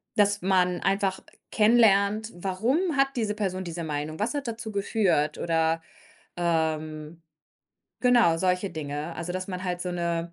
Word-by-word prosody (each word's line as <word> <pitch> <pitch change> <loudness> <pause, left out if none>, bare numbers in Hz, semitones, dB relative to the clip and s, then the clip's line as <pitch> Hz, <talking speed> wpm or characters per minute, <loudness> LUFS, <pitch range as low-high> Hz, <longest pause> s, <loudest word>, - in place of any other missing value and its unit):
dass 205 -1 +3
man 180 -2 +2
einfach 195 -1 0 0.3
kennenlernt, 215 -1 +4
warum 195 - 0 0.2
hat 275 0 +5
diese 220 -4 0
Person 190 -3 -2
diese 170 0 -5
Meinung? 155 0 -4
Was 215 +6 -1
hat 280 -3 -3
dazu 225 -1 -5
geführt? 195 -7 +1
Oder, 165 -1 +1 0.6
ähm, 160 -1 -1 0.8
genau, 240 -10 +4
solche 185 +2 0
Dinge, 150 0 -5
also 175 +1 -4
dass 185 +1 -4
man 185 0 -5
halt 180 -1 -2
so 180 - -3
'ne, 170 -1 -2
185 Hz, 145 wpm, -26 LUFS, 165-205 Hz, 0.8 s, hat